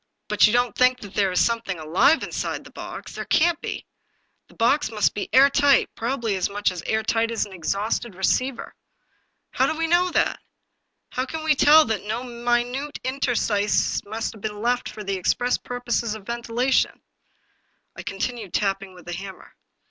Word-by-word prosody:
" -, -, -54 dB
But -, -, +5 dB
you -, -, +1 dB
don't 245 Hz, -2 st, +2 dB
think 250 Hz, 0 st, +3 dB
that 205 Hz, -1 st, -10 dB
there 195 Hz, -2 st, +1 dB
is 180 Hz, -, +1 dB
something 230 Hz, -5 st, -2 dB
alive 165 Hz, -, +3 dB
in -, -, -6 dB
side -, -, -3 dB
the -, -, -14 dB
box? -, -, -8 dB
There -, -, -5 dB
can't 340 Hz, +1 st, +2 dB
be. -, -, -5 dB, 0.6 s
The -, -, -21 dB
box 265 Hz, +4 st, +2 dB
must 210 Hz, -2 st, +1 dB
be 205 Hz, -, -4 dB
air 270 Hz, +2 st, +7 dB
tight, 280 Hz, -1 st, +3 dB
probably 230 Hz, -3 st, -2 dB
as 185 Hz, -, 0 dB
much 205 Hz, -1 st, 0 dB
air 220 Hz, 0 st, +1 dB
tight 225 Hz, +1 st, +1 dB
as 230 Hz, -2 st, -1 dB
an 200 Hz, -, -12 dB
exhausted 200 Hz, +5 st, -2 dB
receiver." 255 Hz, +7 st, -1 dB, 0.4 s
" -, -, -46 dB
How -, -, +2 dB
do 315 Hz, -, -2 dB
we 330 Hz, -, 0 dB
know 350 Hz, +2 st, +3 dB
that? -, -, +1 dB, 0.7 s
How 255 Hz, +1 st, -2 dB
can 315 Hz, +3 st, -5 dB
we 315 Hz, -1 st, +4 dB
tell 300 Hz, +2 st, +6 dB
that 220 Hz, -2 st, -2 dB
na 220 Hz, +4 st, -3 dB
minute 245 Hz, +4 st, -1 dB
interstices 240 Hz, -6 st, 0 dB
have 220 Hz, -1 st, -4 dB
been 210 Hz, -1 st, -4 dB
left 245 Hz, +1 st, 0 dB
for 215 Hz, -, -8 dB
the 195 Hz, -1 st, -2 dB
express 245 Hz, +7 st, +1 dB
purpose 245 Hz, -1 st, -2 dB
of 210 Hz, -3 st, -11 dB
ventilation? 235 Hz, +2 st, 0 dB, 0.4 s
" -, -, -44 dB
I -, -, -7 dB
continued 200 Hz, 0 st, -4 dB
tapping 195 Hz, -2 st, -1 dB
with 180 Hz, -, -15 dB
the 175 Hz, -, -5 dB
hammer. 190 Hz, +2 st, -9 dB
230 Hz, 185 wpm, -24 LUFS, 205-255 Hz, 0.7 s, air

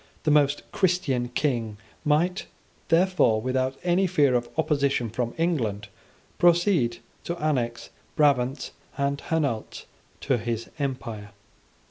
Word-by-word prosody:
The 150 Hz, -, +2 dB
most 145 Hz, -1 st, +3 dB
Christian 155 Hz, -10 st, +1 dB
King 120 Hz, -5 st, -1 dB, 0.3 s
might, 170 Hz, +5 st, +1 dB, 0.4 s
therefore, 170 Hz, -9 st, +3 dB
without 130 Hz, +2 st, -1 dB
any 180 Hz, +2 st, +2 dB
fear 145 Hz, -7 st, +3 dB
of 120 Hz, -1 st, 0 dB
opposition 140 Hz, -7 st, +1 dB
from 120 Hz, +1 st, -3 dB
England, 115 Hz, -, -1 dB, 0.5 s
proceed 175 Hz, -, +3 dB, 0.3 s
to 170 Hz, -, -4 dB
annex 125 Hz, -7 st, -2 dB, 0.2 s
Brabant 135 Hz, -2 st, +2 dB, 0.3 s
and 140 Hz, 0 st, -1 dB
Hainault 140 Hz, -9 st, -2 dB, 0.4 s
to 130 Hz, -3 st, +1 dB
his 115 Hz, 0 st, -4 dB
empire. 120 Hz, -7 st, -4 dB
140 Hz, 110 wpm, -26 LUFS, 120-160 Hz, 0.5 s, most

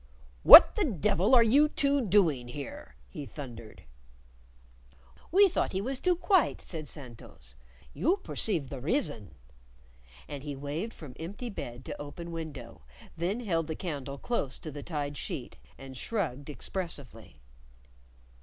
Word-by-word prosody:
"What -, -, +11 dB
the 425 Hz, -, +1 dB
devil 200 Hz, -, +2 dB
are 235 Hz, -, +7 dB
you 280 Hz, +7 st, +4 dB
two 280 Hz, -1 st, +1 dB
doing 170 Hz, -, +2 dB
here?" 135 Hz, -, -8 dB
he 140 Hz, -, -8 dB
thundered. 115 Hz, -7 st, -10 dB, 1.5 s
"We 395 Hz, +4 st, +7 dB
thought 365 Hz, -, -1 dB
he 190 Hz, -, 0 dB
was 260 Hz, +4 st, -3 dB
too 360 Hz, -1 st, +2 dB
quite," 370 Hz, 0 st, +2 dB
said 155 Hz, -4 st, -7 dB
Santos. 115 Hz, -, -10 dB, 0.4 s
"You 360 Hz, +6 st, +1 dB
percive 165 Hz, -, -2 dB
the 135 Hz, -, -6 dB
rizzon." 145 Hz, -, -2 dB, 0.9 s
And 145 Hz, -2 st, -7 dB
he 145 Hz, 0 st, -6 dB
waved 145 Hz, +11 st, -5 dB
from 145 Hz, -6 st, -10 dB
empty 205 Hz, +9 st, -6 dB
bed 120 Hz, -9 st, -7 dB
to -, -, -6 dB
open 170 Hz, +4 st, -8 dB
window, 145 Hz, -, -7 dB, 0.3 s
then 185 Hz, +8 st, -2 dB
held 165 Hz, -8 st, -1 dB
the 160 Hz, -, -4 dB
candle 140 Hz, -6 st, -5 dB
close 140 Hz, -, -2 dB
to 155 Hz, -, -7 dB
the 145 Hz, 0 st, -7 dB
tied 145 Hz, -2 st, -4 dB
sheet, -, -, -5 dB, 0.2 s
and 135 Hz, -1 st, -10 dB
shrugged 145 Hz, -, -3 dB
expressively. 145 Hz, -, -6 dB
155 Hz, 140 wpm, -29 LUFS, 135-215 Hz, 1.5 s, What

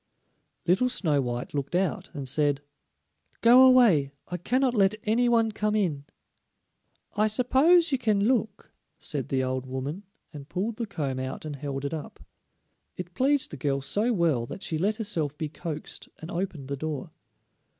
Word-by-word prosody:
Little 190 Hz, +9 st, +3 dB
Snow 155 Hz, -, +1 dB
white 120 Hz, -1 st, -4 dB
looked 145 Hz, +3 st, -3 dB
out 190 Hz, +1 st, -1 dB
and 140 Hz, -2 st, -5 dB
said: 145 Hz, +1 st, +1 dB, 0.8 s
"Go 245 Hz, +3 st, +8 dB
away; 210 Hz, -, +5 dB, 0.2 s
I 180 Hz, -, -3 dB
cannot 250 Hz, +8 st, +1 dB
let 200 Hz, -2 st, +3 dB
any 235 Hz, +3 st, +2 dB
one 230 Hz, -2 st, +3 dB
come 210 Hz, 0 st, -1 dB
in." 160 Hz, -9 st, -1 dB, 1.1 s
"I 210 Hz, +1 st, +3 dB
suppose 275 Hz, +10 st, +4 dB
you 270 Hz, -, +1 dB
can 210 Hz, -4 st, +1 dB
look," 220 Hz, -5 st, -1 dB, 0.3 s
said 145 Hz, -4 st, -3 dB
the 130 Hz, -1 st, +1 dB
old 130 Hz, 0 st, -2 dB
woman, 135 Hz, +7 st, -4 dB, 0.3 s
and 145 Hz, -1 st, -10 dB
pulled 210 Hz, +5 st, -3 dB
the 230 Hz, -, -3 dB
comb 140 Hz, -9 st, -3 dB
out 130 Hz, +3 st, -5 dB
and 150 Hz, -2 st, -5 dB
held 140 Hz, 0 st, -5 dB
it 140 Hz, -, -3 dB
up. 155 Hz, -2 st, -7 dB, 0.8 s
It 180 Hz, -1 st, -7 dB
pleased 275 Hz, +5 st, +2 dB
the 150 Hz, -, -7 dB
girl 140 Hz, +1 st, 0 dB
so 210 Hz, -, +1 dB
well 160 Hz, -, +1 dB
that 190 Hz, -, -7 dB
she 160 Hz, -4 st, -2 dB
let 205 Hz, +5 st, +1 dB
herself 160 Hz, -10 st, -2 dB
be 155 Hz, -2 st, -3 dB
coaxed 155 Hz, -1 st, -6 dB
and 160 Hz, -, -9 dB
opened 170 Hz, -6 st, -4 dB
the 140 Hz, -, -1 dB
door. 150 Hz, -1 st, -4 dB
175 Hz, 170 wpm, -27 LUFS, 145-220 Hz, 1.1 s, Go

